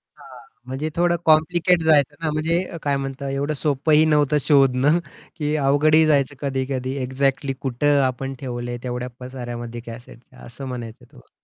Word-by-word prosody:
हां, 135 -4 -14 0.3
म्हणजे 135 +4 -3
थोडं 175 0 +2
कॉम्प्लिकेट 170 +3 +3
जायचं 150 -2 +4
ना 155 - 0
म्हणजे 160 +3 +1 0.2
काय 140 -1 +1
म्हणतात 135 0 -5
एवढं 140 +2 -1
सोपंही 150 +2 +2
नव्हतं 150 -1 +3
शोधणं 140 +2 +3 0.4
की 150 -1 -1
अवघडही 155 +3 +4
जायचं 145 -2 +2
कधी-कधी 130 -1 -2
एक्झॅक्टली 135 +2 -1
कुठं 140 +2 +1
आपण 135 +1 -4
ठेवलंय 120 -2 -5
तेवढ्या 125 0 -4
पसाऱ्यामध्ये 120 -2 -7
कॅसेटच्या 120 0 -12
असं 120 +3 -9
म्हणायचं 120 -3 -7
होतं - - -21
मला. - - -19
140 Hz, 145 wpm, -22 LUFS, 130-150 Hz, 0.4 s, जायचं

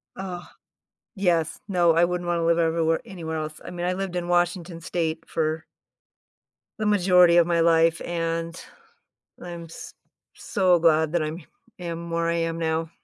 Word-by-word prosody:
Uh, 180 -2 -6 0.7
yes. 175 -5 0
No, 175 -3 +3
I 170 - +5
wouldn't 175 0 -2
wanna 170 -1 0
live 170 0 +3
everywhere 165 0 +1
anywhere 170 -7 -6
else. 155 0 -6
I - - -7
mean, 175 0 -4
I 180 - +1
lived 185 -1 -4
in 175 -1 -3
Washington 175 -1 0
State 165 -1 -3
for 155 0 -1 1.2
the 215 - -1
majority 180 -3 +5
of 170 - +6
my 170 -1 +1
life, 165 0 +3
and 165 0 -3 0.8
I'm 170 -1 -7
s 165 - -10 0.4
so 185 -3 +2
glad 160 -1 +3
that 170 -2 +1
I'm 155 +3 -4 0.4
am 170 -1 -6
where 170 0 0
I 170 - +1
am 165 0 -1
now. 160 0 -1
170 Hz, 160 wpm, -25 LUFS, 165-175 Hz, 1.2 s, of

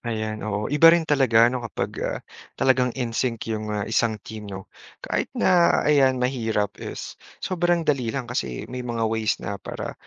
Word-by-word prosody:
Ayan 110 -2 -3
oo, 105 +4 -3
iba 155 +3 +7
rin 165 0 +5
talaga 125 -6 +4
'no 125 - -2
kapag, - - -3
ah, - - -2 0.4
talagang 130 -1 +3
in-sync 120 -1 -2
'yong, 110 -1 -3
ah, 105 -1 -2
isang 115 0 +1
team, 110 -2 -8
no? 95 -1 -7 0.4
Kahit - - -1
na 180 -2 +4
ayan 135 -3 +4
mahirap, 115 -5 -1
is - - -6 0.3
sobrang 175 -2 +1
dali 130 -6 +1
lang 130 +1 -2
kasi 120 - -3
may 125 - -4
mga 120 -2 -2
ways 110 -1 0
na 100 +1 -6
para, - - -6
120 Hz, 175 wpm, -24 LUFS, 110-135 Hz, 0.4 s, iba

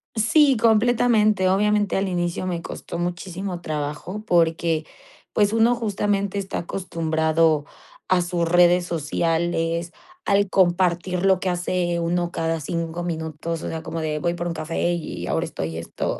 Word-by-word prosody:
Sí, 270 +5 +4
completamente. 220 -3 +3
Obviamente 210 +1 +2
al 195 +1 0
inicio 175 0 -2
me 175 -2 -2
costó 170 - -7
muchísimo 175 +1 -4
trabajo 155 +7 -4
porque, 165 -4 +2 0.5
pues, 205 0 +2
uno 225 +2 +4
justamente 205 -3 -1
está 195 -1 -3
acostumbrado 160 -3 0 0.4
a 185 -1 +3
sus 175 -1 -1
redes 175 0 +5
sociales, 165 +1 -1 0.3
al 200 -1 +2
compartir 180 0 +2
lo 190 -2 +4
que 185 - -1
hace 175 -1 -1
uno 175 +1 -1
cada 165 0 -1
5 170 +2 -3
minutos, 160 -1 -4
o - - -3
sea, 160 -1 -4
como 165 0 -4
de 155 -1 -2
voy 170 +3 0
por 175 0 -3
un 170 - -2
café, 165 +2 -1
y 170 - -5
ahora - - 0
estoy 80 +1 -5
esto. 85 - -4
175 Hz, 150 wpm, -23 LUFS, 165-195 Hz, 0.5 s, redes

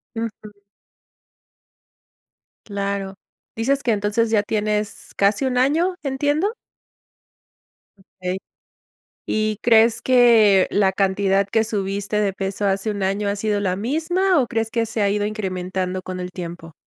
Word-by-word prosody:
Ujú. 215 -2 -6 2.1
Claro, 200 -1 -3 0.4
¿dices 275 +5 0
que 235 - +1
entonces 210 +2 0
ya 215 -2 +3
tienes 210 0 -2
casi 200 +5 +2
un 250 -1 -1
año? 320 +8 +2
¿Entiendo? 290 +7 0 1.5
Okey. 185 -1 -6 0.9
Y, 215 -1 0
¿crees 225 0 +4
que 230 -6 +5
la 195 -2 +3
cantidad 195 0 +1
que 220 +2 +2
subiste 205 0 -2
de 200 -2 0
peso 195 +1 -3
hace 195 +2 0
un 200 -2 -3
año 200 +2 0
ha 200 - 0
sido 205 0 -1
la 185 -3 0
misma 325 - +1
o 250 - +1
crees 225 -1 -2
que 230 -1 0
se 220 0 -3
ha 200 - +3
ido 205 +1 0
incrementando 185 -3 -3
con 185 0 -6
el 180 0 -5
tiempo? 170 -2 -8
210 Hz, 135 wpm, -21 LUFS, 195-230 Hz, 2.1 s, que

